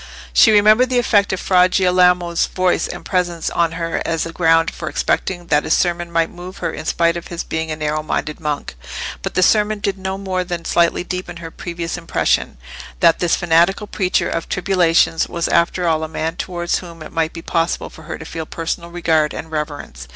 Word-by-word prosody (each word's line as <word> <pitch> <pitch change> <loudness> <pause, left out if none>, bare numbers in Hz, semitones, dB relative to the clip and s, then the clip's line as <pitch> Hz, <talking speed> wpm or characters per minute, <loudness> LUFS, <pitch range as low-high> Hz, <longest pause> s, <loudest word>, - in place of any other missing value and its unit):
She - - +7
remembered 215 +4 +5
the 255 - +1
effect 205 -4 +3
of 190 - -2
Fra 180 0 +4
Girolamo's 180 -2 +3
voice 185 -1 +1
and - - -8
presence 175 -3 -1
on 170 -1 +1
her 165 0 -2
as 165 -1 -1
a 165 - -7
ground 165 0 +3
for - - -6
expecting 175 -2 -1
that 150 - +4
his 160 - +2
sermon 175 -1 0
might 165 -1 +1
move 180 +2 -10
her - - -3
in - - -7
spite 170 +1 +2
of 170 - -6
his 170 -1 -5
being 160 0 -3
a 155 - -2
narrow 155 0 -1
minded 155 0 -3
monk. 150 - -3 0.5
But - - -5
the 185 - +3
sermon 210 +2 +3
did 200 -1 -2
no 190 0 -3
more 190 -2 -2
than 175 -2 -5
slightly 170 0 +2
deepen 180 -1 -5
her 165 -1 -8
previous 170 0 -5
impression, 165 - 0 0.4
that 170 -1 +4
this 175 -2 +2
fanatical 175 +4 +2
preacher 190 -2 0
of 165 - -3
tribulations 175 -3 +2
was 170 -1 -1
after 170 +1 +1
all 160 -1 +1
a - - -2
man 160 +1 -3
towards 175 -1 -2
whom 170 -3 -10
it - - -10
might 165 0 0
be 165 - -9
possible 165 0 -1
for - - -13
her 160 - -5
to 160 - -10
feel 160 0 -6
personal 170 +1 -4
regard 160 -3 +1
and 160 - -7
reverence. 145 - -5
170 Hz, 205 wpm, -19 LUFS, 165-185 Hz, 0.5 s, She